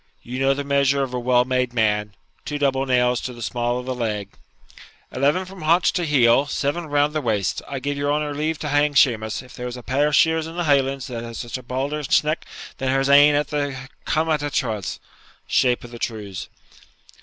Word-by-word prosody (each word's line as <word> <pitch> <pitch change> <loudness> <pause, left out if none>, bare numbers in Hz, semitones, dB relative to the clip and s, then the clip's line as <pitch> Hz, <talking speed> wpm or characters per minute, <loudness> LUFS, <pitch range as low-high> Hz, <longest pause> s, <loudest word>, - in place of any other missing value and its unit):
You 125 +2 -5
know 135 0 +3
the 145 - -3
measure 140 0 +2
of 130 -2 -5
a 125 - -1
well 125 0 +3
made 125 -1 0
man 105 -2 0 0.3
two 150 - -4
double 135 -1 +1
nails 125 -1 +2
to 125 - -5
the 120 -1 -8
small 120 +2 -1
of 125 - -5
the 130 - -2
leg 110 -5 -3 0.4
' - - -21
'Eleven 145 +8 +1
from 190 0 -11
haunch 165 +3 +3
to 175 - -1
heel, 135 -1 +4
seven 150 +4 -2
round 145 0 +1
the 155 - -1
waist. 105 - -1
I 140 - -4
give 140 +2 -3
your 145 0 0
honour 150 0 -1
leave 155 +2 -1
to 150 - -3
hang 145 0 +2
Shemus, 115 -5 +2
if 125 - -15
there's 125 0 -6
a 125 - -10
pair 140 +4 +1
of 150 - +1
sheers 160 +1 +3
in 165 - -9
the 175 - -1
Highlands 135 -3 +1
that 120 -2 -5
has 115 0 -6
a 130 - -4
baulder 135 +4 -3
sneck 150 +2 +1 0.3
than 130 - -1
her's 135 +1 +1
ain 145 +1 +7
at 145 +1 0
the 145 -3 -2 0.3
cumadh 155 -1 +1
an 145 - -2
truais' 110 -8 -2 0.5
(shape 125 -1 +2
of 120 - -11
the 120 - -9
trews). 105 -6 -5
135 Hz, 215 wpm, -22 LUFS, 125-145 Hz, 0.5 s, ain